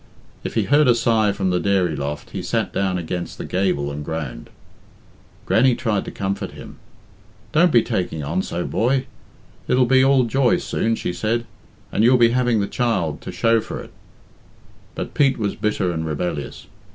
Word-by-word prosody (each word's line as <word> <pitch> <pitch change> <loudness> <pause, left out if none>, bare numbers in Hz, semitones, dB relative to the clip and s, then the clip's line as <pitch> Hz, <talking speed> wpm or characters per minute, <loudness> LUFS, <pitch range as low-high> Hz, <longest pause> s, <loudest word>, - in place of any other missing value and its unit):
If - - -5
he - - +2
heard 145 0 +4
a 120 - +5
sigh 115 -3 +2
from 95 -2 -1
the 90 - +1
dairy 95 -5 +1
loft, 75 +1 -5
he - - -4
sat - - -2
down 95 -2 0
against 85 +1 -4
the - - -6
gable 90 -7 0
and 75 +1 -5
groaned. 70 -6 -5 1.0
Grannie 130 -1 +4
tried 105 -4 -1
to - - -6
comfort 100 0 -3
him. - - -11 0.7
"Don't 175 +2 +4
be 120 -4 +5
taking 80 -4 -2
on 85 +6 -1
so, 90 -1 -4
boy. 130 +3 +1 0.6
It'll 125 0 +3
be 130 +1 +4
all 135 -1 +4
joy 125 +1 +2
soon," 115 0 -1
said 110 +4 -1
she, - - -17 0.5
"and 105 - +1
you'll 125 +2 +6
be 120 -1 +5
having 120 -3 +2
the 100 - -1
child 95 -11 -1
to - - -7
shew 115 +5 +2
for - - -6
it." - - -10 1.0
But - - -5
Pete 140 -2 +3
was 105 -3 -1
bitter 100 -4 0
and 80 -1 -3
rebellious. 80 -1 -4
100 Hz, 180 wpm, -21 LUFS, 90-120 Hz, 1.0 s, you'll